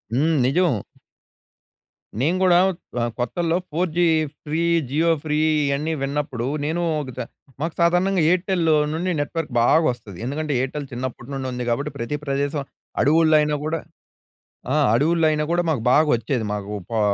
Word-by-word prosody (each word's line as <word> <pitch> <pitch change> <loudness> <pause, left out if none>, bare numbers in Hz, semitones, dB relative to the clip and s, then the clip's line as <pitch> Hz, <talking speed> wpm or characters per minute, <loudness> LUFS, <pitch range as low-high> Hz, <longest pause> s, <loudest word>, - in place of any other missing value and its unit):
హ్మ్. 155 +4 +2
నిజం. 140 - +2 1.4
నేను 160 +8 +1
కూడా 180 -2 +5 0.5
ఆహ్, 120 0 -1
కొత్తల్లో 165 +7 0
four 175 +4 0
G 175 - +4 0.4
free 155 +2 -1 0.3
Jio 160 +5 +2
free 150 -1 -1 0.3
ఇవన్నీ 140 +3 -1
విన్నప్పుడు 135 -3 -2 0.2
నేను 165 +3 -1 0.2
ఒక 135 - -7
చ - - -5 0.4
మాకు 165 +1 -2
సాధారణంగా 180 +2 +3
ఎయిర్టెల్ 180 0 +1 0.3
నుండి 175 +3 -1
నెట్‌వర్క్ 150 +1 -3
బాగా 120 +7 +5
వస్తది. 110 -7 -6
ఎందుకంటే, 145 +3 -2
ఎయిర్టెల్ 140 +2 -3
చిన్నప్పటి 125 0 -6
నుండి 135 -1 -3
ఉంది 125 0 -4
కాబట్టి 140 +5 -1
ప్రతి 120 +4 -3
ప్రదేశం, 140 +1 -1 0.4
అడవుల్లో 155 +3 +4
అయినా 150 0 0
కూడా 160 +1 -1 0.9
ఆ! - - +2 0.2
అడవుల్లో 160 +6 +2
అయినా 150 0 0
కూడా 175 +1 +2
మాకు 145 -7 0
బాగా 155 +4 +5
వచ్చేది. 115 +1 -2
మాకు 105 0 -5 0.2
పా 115 - 0
150 Hz, 150 wpm, -22 LUFS, 130-165 Hz, 1.4 s, కూడా